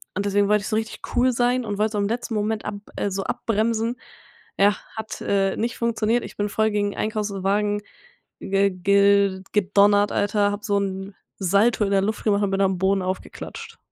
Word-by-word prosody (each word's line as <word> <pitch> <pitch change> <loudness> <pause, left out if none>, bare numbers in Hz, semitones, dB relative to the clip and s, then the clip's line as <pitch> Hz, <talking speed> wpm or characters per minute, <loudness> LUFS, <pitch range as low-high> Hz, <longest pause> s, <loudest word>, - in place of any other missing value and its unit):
und 200 +1 -1
deswegen 200 0 +2
wollte 210 0 +3
ich - - -6
so 215 - 0
richtig 220 0 -4
cool 255 +1 +4
sein 245 +1 +1
und 205 -1 -3
wollte 215 +1 +1
so - - -1
im 200 0 +1
letzten 230 0 -3
Moment 215 +1 -1
ab 210 - -3 0.2
äh, 205 - -1
so 195 0 -2
abbremsen. 230 +2 -1 0.6
Ja, 205 +1 +5 0.2
hat, 220 0 -6
äh, 195 -1 +1
nicht 230 +1 -2
funktioniert. 230 0 0
Ich - - -9
bin 205 0 -1
voll 220 +1 +1
gegen 205 -1 0
'n - - -14
Einkaufswagen 205 -1 -1 0.6
ge 195 0 +1
gel 200 +1 +3
gedonnert, 205 0 +3
Alter, 205 0 +1
hab 205 +1 -5
so 200 -2 +1
'n 195 0 -4 0.3
Salto 200 +4 +3
in 200 - -2
der 195 -1 +3
Luft 215 +2 -2
gemacht 205 -1 +2
und 200 - +1
bin 195 0 0
am 190 -1 +2
Boden 190 0 +2
aufgeklatscht. 185 +1 -6
205 Hz, 200 wpm, -23 LUFS, 200-220 Hz, 0.6 s, Ja